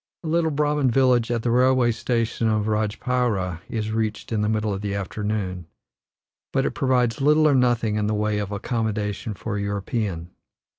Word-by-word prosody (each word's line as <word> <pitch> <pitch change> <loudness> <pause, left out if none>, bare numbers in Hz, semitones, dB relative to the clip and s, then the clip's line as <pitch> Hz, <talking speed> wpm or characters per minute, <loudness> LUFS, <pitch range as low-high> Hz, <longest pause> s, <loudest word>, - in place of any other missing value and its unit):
A - - -5
little 165 0 +2
Brahman 145 -2 +1
village 125 -2 +3
at 120 -2 -1
the 120 - +1
railway 125 0 +4
station 115 0 -1
of 110 -1 +1
Rajpaira 105 -4 -1
is 110 -1 -2
reached 110 0 -2
in 110 -2 0
the 105 - +1
middle 110 -1 0
of 95 - -4
the 100 -1 -2
afternoon; 100 -3 -3 0.8
but - - +1
it - - 0
provides 125 -2 +1
little 150 +2 +5
or 145 - +4
nothing 120 -4 +2
in 105 -1 0
the 105 - 0
way 105 0 0
of 105 -1 -4
accommodation 105 -1 -2
for 105 +1 -4
a - - -2
European. 100 -3 -3
110 Hz, 180 wpm, -24 LUFS, 105-125 Hz, 0.8 s, little